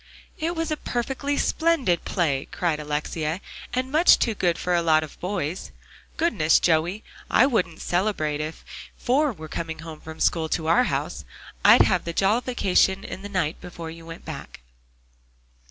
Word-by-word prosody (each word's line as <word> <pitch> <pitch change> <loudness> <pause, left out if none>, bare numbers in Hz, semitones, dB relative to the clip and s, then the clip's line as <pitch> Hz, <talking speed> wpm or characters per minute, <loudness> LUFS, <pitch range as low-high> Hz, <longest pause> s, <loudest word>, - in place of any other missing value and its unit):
"It 335 +2 -1
was 325 -1 -2
a 305 - 0
perfectly 270 +4 -2
splendid 315 - +1
play!" 150 -8 0
cried 165 -4 -1
Alexia, 150 +2 -2 0.3
"and 255 +1 -2
much 320 +4 +6
too 230 - +1
good 175 -4 0
for 180 - -1
a 170 - +3
lot 155 -2 +3
of 155 - -10
boys. 180 -3 -3 0.5
Goodness, 185 - +3
Joey, 170 +5 +1 0.3
I 255 - +5
wouldn't 200 - -1
celebrate 175 -6 0
if 155 +1 -6
you - - -12
four 275 +4 +2
were 160 -8 -9
coming 160 +1 -4
home 160 -2 -9
from 160 0 -10
school 160 -2 +1
to 160 - -1
our 170 +10 +4
house. - - -3 0.4
I'd - - +8
have 185 -3 +1
the 170 - -3
jollification 195 -2 +2
the 200 +2 -7
night 180 -5 -1
before 170 -2 -8
you 165 0 -11
went 165 0 -10
back." - - -8
175 Hz, 165 wpm, -24 LUFS, 160-240 Hz, 0.5 s, I'd